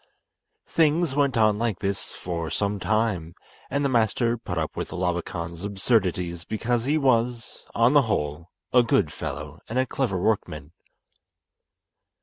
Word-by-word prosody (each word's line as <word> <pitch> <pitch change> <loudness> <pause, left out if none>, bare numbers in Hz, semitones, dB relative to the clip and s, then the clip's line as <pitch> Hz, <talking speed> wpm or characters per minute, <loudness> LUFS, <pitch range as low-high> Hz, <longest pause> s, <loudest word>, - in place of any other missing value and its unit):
Things 160 -1 +2
went 140 -4 +2
on 110 -2 +4
like 115 -5 0
this 100 0 -3
for 85 -2 -4
some 100 0 -1
time, 100 -6 0 0.3
and 140 +1 0
the - - +2
master 115 0 +2
put 100 -7 -5
up 80 -2 -2
with - - -4
Labakan's 85 -1 -3
absurdities 95 -4 0
because 115 +4 -1
he 150 +3 +2
was, 120 -4 0
on 115 +4 +4
the 145 - +7
whole, 85 - -2 0.2
a 125 - +7
good 115 - +2
fellow 75 +2 -6
and 115 - -2
a 130 - +3
clever 115 -7 -1
workman. 85 -7 -1
110 Hz, 140 wpm, -25 LUFS, 90-120 Hz, 0.3 s, the